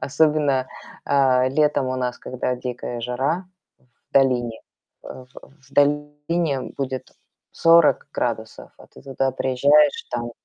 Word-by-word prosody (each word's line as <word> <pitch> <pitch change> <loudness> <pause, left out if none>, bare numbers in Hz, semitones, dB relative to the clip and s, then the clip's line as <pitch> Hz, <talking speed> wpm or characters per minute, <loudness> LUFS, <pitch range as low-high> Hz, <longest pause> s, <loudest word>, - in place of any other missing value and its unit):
Особенно, 145 -2 +1 0.4
э, 130 -2 +3
летом 145 -1 +1
у 130 0 -2
нас, 125 -1 -3
когда 125 0 -3
дикая 125 -1 -6
жара 135 +10 -2 0.6
в - - -43
долине, 125 -4 +2 0.4
В 130 -1 -10 0.4
в - - -23
долине 145 +1 0 0.2
будет 130 -2 -4 0.4
40 165 -3 +4
градусов, 110 -2 -4
а - - -16
ты - - -17
туда 135 -1 -2
приезжаешь, 140 +3 +3
там, 120 0 -3
135 Hz, 120 wpm, -22 LUFS, 125-145 Hz, 0.6 s, 40